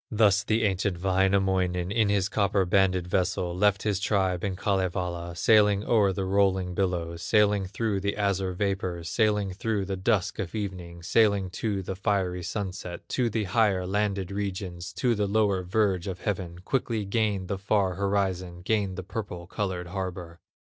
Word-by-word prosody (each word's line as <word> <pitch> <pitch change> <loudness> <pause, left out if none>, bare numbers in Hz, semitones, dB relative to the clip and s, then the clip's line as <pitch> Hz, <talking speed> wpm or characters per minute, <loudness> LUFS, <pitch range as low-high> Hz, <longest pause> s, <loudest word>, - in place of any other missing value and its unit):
Thus 105 -3 +3
the 110 +2 +1
ancient 95 -3 0
Wainamoinen, 95 -1 +1
In 110 -1 +2
his 100 -2 +2
copper 100 -2 +1
banded 95 -1 +2
vessel, 90 -1 -1
Left 100 +1 +2
his 105 -3 0
tribe 95 -3 0
in 95 -2 -1
Kalevala, 90 -3 -2
Sailing 105 +1 +4
o'er 105 -4 +3
the 95 +1 -3
rolling 95 -2 +1
billows, 85 -3 -2
Sailing 105 -2 +3
through 105 +1 -1
the 100 +2 -2
azure 100 -2 0
vapors, 90 -3 -2
Sailing 105 +1 +1
through 105 0 -1
the 95 0 -3
dusk 95 0 0
of 95 +2 -4
evening, 90 -5 -5
Sailing 100 -1 +2
to 100 0 -2
the 95 +1 -4
fiery 95 -2 0
sunset, 95 -1 -5
To 125 -2 +1
the 110 0 -1
higher 95 -2 +2
landed 100 -1 -1
regions, 95 -3 -4
To 125 -2 +1
the 105 -2 0
lower 100 -2 +2
verge 95 -1 0
of 95 -2 -5
heaven; 90 -4 -3
Quickly 115 -5 -1
gained 100 -2 0
the 100 0 -3
far 100 -1 +1
horizon, 95 -2 -1
Gained 100 -2 0
the 95 - -5
purple 95 -3 -6
colored 95 -1 -3
harbor. 90 -3 -5
95 Hz, 160 wpm, -27 LUFS, 90-105 Hz, -, Sailing